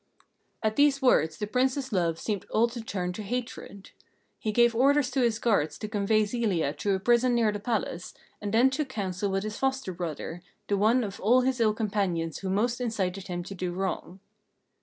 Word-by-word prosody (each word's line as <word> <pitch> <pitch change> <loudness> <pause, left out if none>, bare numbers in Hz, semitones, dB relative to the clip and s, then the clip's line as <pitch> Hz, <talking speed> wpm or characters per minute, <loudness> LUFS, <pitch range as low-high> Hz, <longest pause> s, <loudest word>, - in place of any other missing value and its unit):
At 220 0 0
these 285 -1 +4
words 160 - +3
the 210 - -2
Prince's 260 +3 0
love 170 -3 +1
seemed 200 +1 -3
all 230 +2 +3
to 235 0 -6
turn 180 -5 -3
to 215 - -6
hatred. 210 -3 -6 0.5
He 215 - -2
gave 235 +2 +4
orders 275 +2 +3
to 270 - +1
his 235 -3 +2
guards 160 -11 +1
to 215 - -5
convey 215 0 +2
Zelia 200 - 0
to 200 +4 0
a - - -2
prison 240 +4 +3
near 225 -3 +3
the 205 - -4
palace, 200 -5 -3 0.3
and 205 -1 -3
then 240 +5 +4
took 275 0 -2
counsel 200 -4 -2
with 195 0 -1
his 215 0 -5
foster 265 -7 -1
brother, 170 0 -5 0.3
the 205 - +1
one 220 +5 +3
of 200 -3 -6
all 245 +5 +4
his 260 0 0
ill 215 -2 +3
companions 195 -7 -1
who 190 - -4
most 235 +6 0
incited 195 -5 -2
him 175 -1 -4
to 195 - -8
do 180 -1 -3
wrong. 190 0 -4
210 Hz, 200 wpm, -28 LUFS, 190-240 Hz, 0.5 s, these